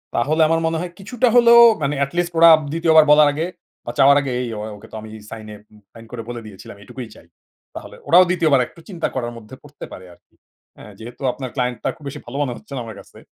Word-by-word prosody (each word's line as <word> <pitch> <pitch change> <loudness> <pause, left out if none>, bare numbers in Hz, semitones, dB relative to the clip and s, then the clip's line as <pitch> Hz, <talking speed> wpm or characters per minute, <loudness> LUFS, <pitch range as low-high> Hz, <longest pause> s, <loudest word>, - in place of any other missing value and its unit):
তাহলে 155 +6 0
আমার 165 +1 +1
মনে 160 0 -2
হয় 180 -1 -6
কিছুটা 240 +5 -1
হলেও 235 -1 +7 0.2
মানে 145 0 -1
এটলিস্ট 175 +5 -2
ওরা 170 0 +8 0.2
২য় 165 0 +1
বার 155 - +8
বলার 150 0 +6
আগে 155 +3 -3 0.4
বা 120 - -4
চাওয়ার 140 +1 +6
আগে 135 -2 -4
এই 125 - -4
ও - - -6 0.2
ওকে 105 +2 -15
তো - - -10
আমি 110 - -11 0.2
সাইনে 110 -1 -10 0.2
উম 105 - -19
সাইন 115 0 -14
করে 125 -2 -6
বলে 120 -1 -6
দিয়েছিলাম 100 -1 -12
এটুকুই 125 +2 -9
চাই। - - -18 0.5
তাহলে - - -10
ওরাও 180 +2 +6
২য় 170 -3 +1
বার 135 - +4
একটু - - -19
চিন্তা 175 -4 -3
করার 120 -2 -3
মধ্যে 115 +3 -13
পড়তে 145 0 -11
পারে 95 - -11
আরকি, - - -28 0.4
হ্যাঁ? 105 - -13
যেহেতু 120 +3 -11
আপনার 130 -2 -7
ক্লায়েন্টটা 125 -3 -2
খুব 155 - -20
বেশি 140 - -7
ভালো 120 +3 -8
মনে 130 -4 -2
হচ্ছে - - -14
না - - -4
আমার 110 -2 -9
কাছে। - - -17
140 Hz, 235 wpm, -19 LUFS, 120-165 Hz, 0.5 s, ওরা